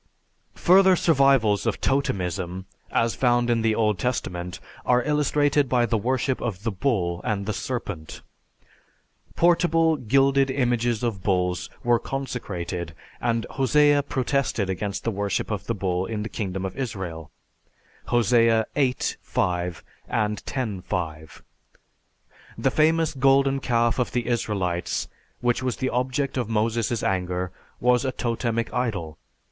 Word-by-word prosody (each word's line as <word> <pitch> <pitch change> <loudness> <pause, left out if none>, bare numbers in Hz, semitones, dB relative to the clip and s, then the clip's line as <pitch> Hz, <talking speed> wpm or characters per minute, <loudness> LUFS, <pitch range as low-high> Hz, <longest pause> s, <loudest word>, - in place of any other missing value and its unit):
Further 190 +1 +5
survivals 135 - +3
of - - 0
totemism 95 -8 -1 0.2
as 115 0 +1
found 120 -1 +2
in 115 -1 +2
the 110 -1 +2
Old 105 -4 +1
Testament 90 -6 -3 0.2
are 125 0 +3
illustrated 145 -1 +2
by 120 -1 +3
the 115 - 0
worship 130 +4 0
of 105 -5 -4
the 115 - 0
bull 95 -6 -1
and 100 -2 -1
the 110 - -2
serpent. 105 - -5 1.1
Portable 165 -2 +3
gilded 135 +2 +3
images 120 -3 0
of 110 -6 -2
bulls 90 -2 0
were 120 -1 +3
consecrated 90 - -4 0.3
and 115 -1 0
Hosea 145 +2 +4
protested 135 -7 -1
against 100 +2 -3
the 115 - 0
worship 100 +1 -2
of 100 -3 -4
the 115 - -1
bull 95 -1 -1
in 110 -2 -3
the 110 - -5
kingdom 95 -3 -3
of 95 - -5
Israel 95 - -5 0.8
(Hos. 120 -2 +1
VIII, 115 -2 +5 0.6
5; 90 -7 -2 0.3
X, 105 0 -2
5). 80 -4 -5 1.1
The - - +1
famous 160 +1 +2
golden 135 0 +3
calf 120 -2 +1
of 125 - -1
the 120 -2 0
Israelites, 100 -7 -1 0.3
which 120 +1 +1
was 130 -2 -2
the 130 - -1
object 130 +2 -1
of 120 -4 -1
Moses' 115 0 0
anger, 90 -1 -1 0.3
was 125 0 +3
a 130 - 0
totemic 115 -2 -2
idol. 95 -11 -2
115 Hz, 130 wpm, -24 LUFS, 95-130 Hz, 1.1 s, Further